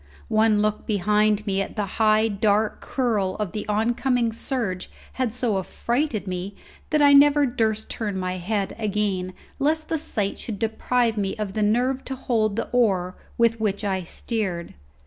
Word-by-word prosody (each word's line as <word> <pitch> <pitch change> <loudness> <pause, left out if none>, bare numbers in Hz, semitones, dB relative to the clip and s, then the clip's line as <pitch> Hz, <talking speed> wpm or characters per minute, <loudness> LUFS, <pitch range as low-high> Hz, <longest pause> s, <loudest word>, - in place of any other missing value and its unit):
One 215 -1 +3
look 215 0 -1
behind 210 +1 +2
me 195 -2 0
at 195 - -5
the 210 - -1 0.2
high 215 0 +4
dark 210 0 +1
curl 215 -8 0
of 210 -4 -3
the 210 - -5
oncoming 235 +3 +1
surge 225 -7 -3 0.3
had 250 -3 +1
so 230 -4 0
affrighted 235 - -2
me 185 +1 -4 0.3
that 305 -1 +3
I 285 0 +7
never 290 +1 +6
durst 220 -3 -1
turn 205 -4 -3
my 185 0 -2
head 195 +2 -2
again 200 -4 -1 0.3
lest 310 +2 0
the 320 - 0
sight 205 -8 -2
should 220 -4 -5
deprive 225 +1 0
me 195 -2 -1
of 210 -3 -4
the 215 - -1
nerve 250 +5 +1
to 265 - -4
hold 220 -5 0
the - - -2
oar 190 -7 +2 0.2
with 230 -1 +3
which 205 -1 -1
I 190 -2 0
steered. 185 -1 -3
215 Hz, 165 wpm, -24 LUFS, 200-235 Hz, 0.3 s, I